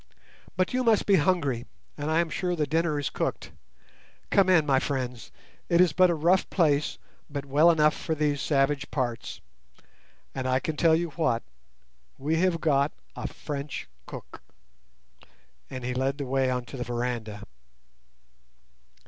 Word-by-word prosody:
But 185 +4 +1
you 255 0 +1
must 225 -3 +3
be 200 -2 +5
hungry, 145 -7 +1 0.3
and 145 +1 -4
I 160 +2 +3
am 165 -2 -3
sure 180 -1 -1
the 155 -3 0
dinner 160 +1 0
is 145 - -2
cooked. - - -3 0.8
Come 195 -2 +4
in, 170 -5 +5
my 135 -2 +3
friends; 125 -4 -4 0.4
it 170 - +3
is 180 -4 +5
but 185 +1 +5
a 170 - +1
rough 175 +5 +2
place, 150 -5 +1 0.3
but 140 -1 -5
well 145 +5 +5
enough 155 -2 +4
for 160 - -3
these 145 -2 0
savage 140 -1 +1
parts; 120 -4 -3 0.9
and 130 -1 -3
I 130 0 +2
can 155 +3 -3
tell 160 +1 +4
you 170 0 -1
what, 130 -8 0 0.7
we 150 +4 0
have 175 -1 +2
got—a 145 -2 -1
French 145 -1 -6 0.2
cook." - - -10 1.3
And 130 -2 -6
he 125 - -1
led 135 +2 -1
the 140 - -4
way 130 0 +1
on 125 -1 -2
to 135 - -9
the 125 - -2
veranda. 120 -3 -3
145 Hz, 155 wpm, -27 LUFS, 130-165 Hz, 1.3 s, be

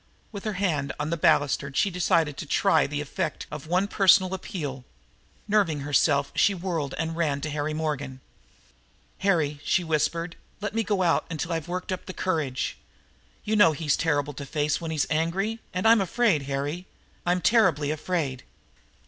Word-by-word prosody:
With 200 -1 -8
her 215 - -1
hand 165 -8 -1
on 150 +2 -2
the - - +1
balustrade 140 -3 +2
she 200 - +2
decided 165 -4 +1
to 155 - -6
try 195 +6 +3
the 145 +1 -3
effect 155 +2 -3
of 150 +1 -7
one 180 +4 +1
personal 190 -2 +4
appeal. 145 -8 -5 0.6
Nerving 195 -9 +2
herself 145 0 +2
she 200 - +3
whirled 170 -6 -3
and 165 0 -2
ran 155 -4 0
to 155 - -3
Harry 150 +1 -2
Morgan. 145 -4 -3 1.0
"Harry," 155 -7 +1
she 180 - +2
whispered, 165 +2 -1 0.2
"let 205 0 -4
me 225 - +1
go 205 -3 0
out 170 -2 +1
till 170 +3 -2
I've 165 -1 -3
worked 180 +1 -4
up 185 - -4
my 185 - -5
courage. 155 -10 -2 0.7
You 215 - 0
know 205 -7 +6
he's 150 -1 0
terrible 145 -3 0
to 140 - -7
face 150 +2 0
when 165 - -4
he's 155 -3 0
angry. 185 +8 0
And 185 +4 0
I'm 225 -2 +6
afraid, 190 - +1
Harry 145 +6 -3 0.4
I'm 175 +1 +1
terribly 165 -8 +3
afraid!" 155 -5 -2
165 Hz, 170 wpm, -26 LUFS, 145-185 Hz, 1.0 s, know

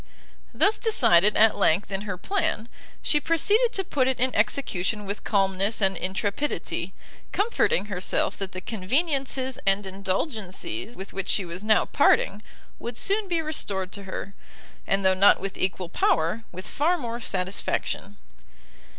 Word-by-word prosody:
Thus 410 +2 +2
decided, 215 - +4
at 220 0 +5
length, 190 +2 +2
in 195 0 -2
her 185 - -3
plan, 320 - -1 0.4
she 295 - +3
proceeded 415 +10 +2
to 385 - 0
put 270 -7 0
it 265 - 0
in 255 +1 +1
execution 210 -2 0
with 200 +1 -5
calmness 195 +1 +1
and 195 -2 +2
intrepidity; 200 - -2 0.4
comforting 405 - +1
herself 195 -3 -1
that 195 -1 -5
the 185 - -6
conveniencies 260 - -1
and 195 +1 +1
indulgencies 195 - -3
with 190 +1 -9
which 195 -1 -4
she 195 - +1
was 175 +3 -7
now 215 0 +3
parting, 205 +2 +2 0.4
would 235 0 -6
soon 405 +1 +1
be 335 -3 0
restored 195 -12 -1
to 200 -1 -6
her, 190 +1 -6 0.5
and 195 0 +1
though 190 - +5
not 195 +2 +5
with 195 - -5
equal 185 -1 -1
power, 170 +5 0
with 185 +1 -8
far 335 +5 +1
more 235 -5 -5
satisfaction. 195 0 -2
205 Hz, 150 wpm, -25 LUFS, 190-265 Hz, 0.5 s, at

